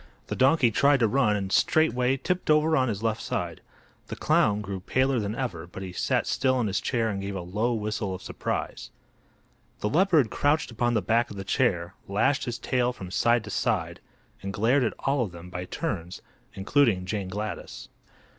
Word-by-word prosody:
The - - -2
donkey 130 -2 +4
tried 140 +5 +4
to 115 - +5
run 110 -2 +2
and 95 -2 -3
straightway 130 -3 +2
tipped 180 +7 -2
over 155 +1 +4
on 130 -2 +2
his 105 -2 -3
left 115 0 0
side. - - -3 0.5
The - - -5
clown 105 0 +2
grew 100 -2 -5
paler 130 +6 +1
than 105 0 -3
ever, 90 -10 -4
but 95 +2 -8
he 95 - -6
sat - - 0
still 130 -1 +1
in 120 - +1
his 100 -2 -1
chair 115 -2 0
and 100 -1 -4
gave 100 0 -4
a 95 - -3
low 105 +7 -1
whistle 105 -2 -2
of 95 - -10
surprise. - - -4 0.9
The 105 - 0
leopard 160 - +3
crouched 145 -1 +1
upon 120 +1 0
the 105 - +1
back 115 +5 +2
of 100 - -9
the 95 - -4
chair, 95 -6 0
lashed 125 +8 +1
his 120 -2 -3
tail 125 -1 0
from 95 -7 -9
side 120 +3 +2
to 105 - -8
side - - -1 0.4
and 100 - -4
glared 120 +7 +2
at 115 - -1
all 135 -1 +1
of 100 -7 -3
them, 85 +1 -11
by 90 0 -5
turns, 90 - -4 0.3
including 100 -2 +2
Jane 100 0 -3
Gladys. 105 +3 -6
110 Hz, 195 wpm, -26 LUFS, 95-130 Hz, 0.9 s, to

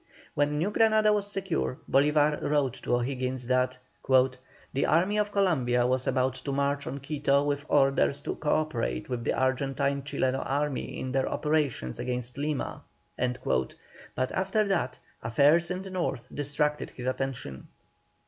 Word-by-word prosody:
When 145 +1 +1
New 175 +7 0
Granada 215 -1 +4
was 205 -1 0
secure, 190 -9 -2
Bolívar 150 +2 +3
wrote 145 -4 +1
to - - +1
O'Higgins 130 0 -2
that: 130 +1 +1 0.3
"The 130 +1 +1
Army 185 +6 +3
of 210 0 0
Columbia 130 -12 +2
was 130 +1 0
about 130 -1 +1
to 140 - -3
march 140 +1 0
on 140 - -4
Quito 140 -1 +1
with 145 +1 -2
orders 140 0 +3
to - - -3
co 150 - -4
operate 60 - -1
with 125 -2 -3
the - - 0
Argentine 135 +1 0
Chileno 135 -1 -1
Army 145 0 -2
in 130 - -4
their 135 0 +1
operations 150 - -1
against 125 +1 -3
Lima," 150 -1 -2 0.3
but 125 0 -3
after 195 +3 +1
that, 170 -11 -1 0.2
affairs 145 +9 +3
in 180 +1 -3
the 190 - -8
North 135 -10 -2
distracted 145 +1 -1
his 125 - -9
attention. 130 - -3
140 Hz, 150 wpm, -28 LUFS, 130-155 Hz, 0.3 s, Granada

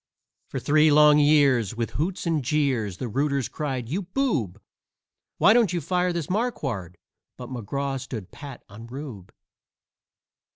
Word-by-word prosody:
For - - -4
three 155 +1 +4
long 150 0 +6
years, 140 -8 +3
with 115 0 -3
hoots 175 +6 -2
and 160 -4 0
jeers, 125 - 0
the 125 - -4
rooters 140 +3 0
cried: 135 -6 -4
"You 170 - -2
boob! 175 - -1 0.8
Why 215 - +6
don't 230 -6 +3
you 175 - 0
fire 180 +3 0
this 170 -4 -3
Marquard?" 135 - -3 0.4
But 125 -1 -8
McGraw 135 +3 -3
stood 110 -8 -7
pat 140 -4 -10
on 110 +3 -11
"Rube." 125 -7 -8
140 Hz, 140 wpm, -25 LUFS, 120-155 Hz, 0.8 s, long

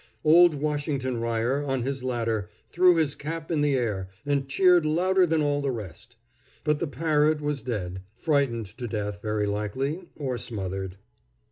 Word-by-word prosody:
Old 170 +1 +6
Washington 145 -3 -1
Ryer, 115 +4 0
on 135 -3 -1
his 135 0 -3
ladder, 115 -6 -1 0.2
threw 180 0 +5
his 155 -4 +1
cap 160 +3 -6
in 155 -3 +1
the 145 -2 +2
air, 105 -7 -1 0.2
and 140 -1 0
cheered 180 +2 +5
louder 180 +4 +3
than 160 -1 +2
all 145 0 +1
the 140 - -1
rest. 110 -1 -7 0.5
But 150 -1 +1
the 170 - -1
parrot 150 +2 +2
was 150 -2 -2
dead 95 -6 -4
frightened 130 -4 +1
to 120 - -3
death, 105 -2 -4
very 105 -1 -1
likely, 130 - -2
or 130 -5 -3
smothered. 95 -3 -4
135 Hz, 160 wpm, -26 LUFS, 115-155 Hz, 0.5 s, Old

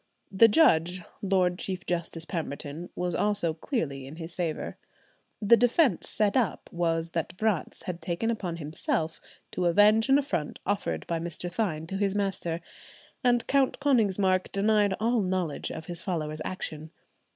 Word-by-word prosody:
The 205 +4 +7
judge, 180 - +4 0.2
Lord 185 -2 +1
Chief 185 -1 -4
Justice 170 -1 -2
Pemberton, 160 -1 -4
was 180 -1 -1
also 205 -5 +1
clearly 155 - -3
in 145 - -9
his 165 +1 -7
favour. 170 -4 -3 0.6
The 215 +2 +6
defence 245 - +3
set 210 -2 +1
up 240 -8 0
was 165 -1 0
that 170 +1 -3
Vratz 215 -6 -1
had 175 -2 -5
taken 175 +8 -1
upon 185 -7 -3
himself 160 +1 -2 0.3
to 180 - -1
avenge 210 +7 +5
an 270 - +7
affront 270 - -2
offered 200 +1 -1
by 165 -1 -2
Mr. 170 +1 -4
Thynne 175 -6 -1
to 190 +4 -4
his 200 0 0
master, 190 -4 -1 0.6
and 245 -1 +3
Count 275 -1 +2
Konigsmark 200 -9 +2
denied 205 -1 +2
all 230 +1 +2
knowledge 185 -5 -1
of 160 - -7
his 170 -1 -3
follower's 155 -4 -3
action. 155 -4 -5
180 Hz, 150 wpm, -28 LUFS, 165-210 Hz, 0.6 s, The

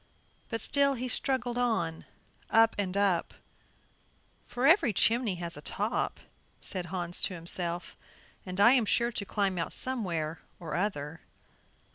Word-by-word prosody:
But 225 -2 -3
still 280 -1 +3
he 255 +1 -4
struggled 245 -1 -1
on, 220 -10 -1 0.4
up 225 0 +5
and 195 -1 -2
up; 195 -4 +1 1.1
"for 245 +2 -2
every 320 - +5
chimney 225 0 +3
has 170 -1 -3
a - - -9
top," 210 +8 -2 0.4
said 180 -3 -5
Hans 175 -1 0
to 185 - +1
himself 175 +1 -1 0.5
"and 185 0 -6
I 235 +4 +7
am 250 -4 +3
sure 235 +3 +1
to 205 - -3
climb 195 -3 -1
out 165 - -3
somewhere 170 -11 -1 0.2
or 165 -3 -7
other." 165 -5 -3
200 Hz, 140 wpm, -29 LUFS, 175-240 Hz, 1.1 s, I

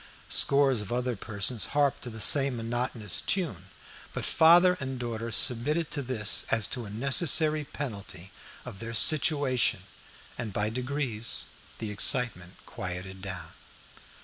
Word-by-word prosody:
Scores 135 -4 +3
of 105 - -8
other 125 0 -1
persons 110 +2 -1
harped 145 -2 +2
to 125 - -5
the 110 -1 -9
same 135 +4 +4
monotonous 115 -3 -3
tune. 140 - -2 0.5
But - - -4
father 175 +3 +5
and 130 -1 -4
daughter 115 -1 -4
submitted 140 +8 0
to 145 - -1
this 120 -5 -1
as 115 -2 +1
to 120 -3 -3
a - - -9
necessary 150 - +2
penalty 100 -10 -7 0.3
of 95 - -9
their 115 +1 -6
situation, 145 -2 +3 0.6
and 115 -3 -4
by 105 +2 -1
degrees 125 -2 -3 0.3
the 110 -2 -5
excitement 100 -4 +2
quieted 95 +1 -7
down. 90 -5 -7
120 Hz, 135 wpm, -28 LUFS, 105-140 Hz, 0.6 s, father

